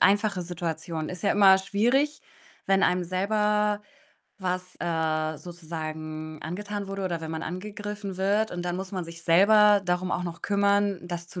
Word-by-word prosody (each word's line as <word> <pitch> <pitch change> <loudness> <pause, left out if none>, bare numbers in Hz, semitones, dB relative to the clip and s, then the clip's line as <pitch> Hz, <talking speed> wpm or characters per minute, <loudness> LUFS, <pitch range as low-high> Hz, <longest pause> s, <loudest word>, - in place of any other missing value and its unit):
einfache 205 -1 +3
Situation. 165 -2 -4
Ist 180 - -7
ja 200 - +2
immer 195 -2 +7
schwierig, 245 +10 +1 0.4
wenn 195 0 +3
einem 180 0 +2
selber 210 +3 +1 0.6
was, 180 -1 -3
äh, 160 -2 0
sozusagen 155 -2 -6
angetan 200 +4 -5
wurde 195 -1 -4
oder 170 -3 -2
wenn 160 0 -5
man 160 0 -4
angegriffen 205 +2 -5
wird, 205 +3 +1
und 175 0 -4
dann 175 0 -1
muss 190 0 -5
man 180 -3 -3
sich 170 0 -10
selber 205 +4 +6
darum 180 0 0
auch 180 - -1
noch 170 -1 -6
kümmern, 200 -1 +2
das 175 -1 -6
zu 180 - -7
185 Hz, 165 wpm, -27 LUFS, 170-205 Hz, 0.6 s, immer